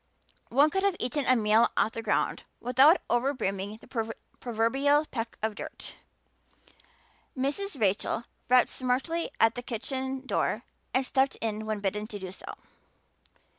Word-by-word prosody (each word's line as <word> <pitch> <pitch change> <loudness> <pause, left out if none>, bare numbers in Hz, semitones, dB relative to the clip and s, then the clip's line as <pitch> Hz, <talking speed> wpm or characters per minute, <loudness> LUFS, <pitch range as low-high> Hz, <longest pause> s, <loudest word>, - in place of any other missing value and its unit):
One 285 +5 +4
could 385 - +1
have 395 -2 +2
eaten 280 +3 -1
a 255 - +6
meal 220 0 +4
off 220 - +3
the 230 - -5
ground 220 -2 0 0.2
without 265 +8 +6
over 260 +4 +1
brimming 200 -2 -3
the 225 0 -4 0.3
proverbial 270 +6 +2
peck 230 -5 -5
of 220 -1 +1
dirt. - - -9 1.4
Mrs. 285 +5 -2
Rachel 205 +2 +1 0.3
rapped 250 0 +6
smartly 265 +7 -1
at 225 0 +5
the 245 - -5
kitchen 260 +3 -4
door - - 0 0.3
and 260 0 +1
stepped 265 +1 +2
in 215 -1 -3
when 215 -1 -2
bidden 210 +2 -2
to 210 - -6
do 190 -2 -7
so. - - -8
245 Hz, 145 wpm, -29 LUFS, 220-270 Hz, 1.4 s, a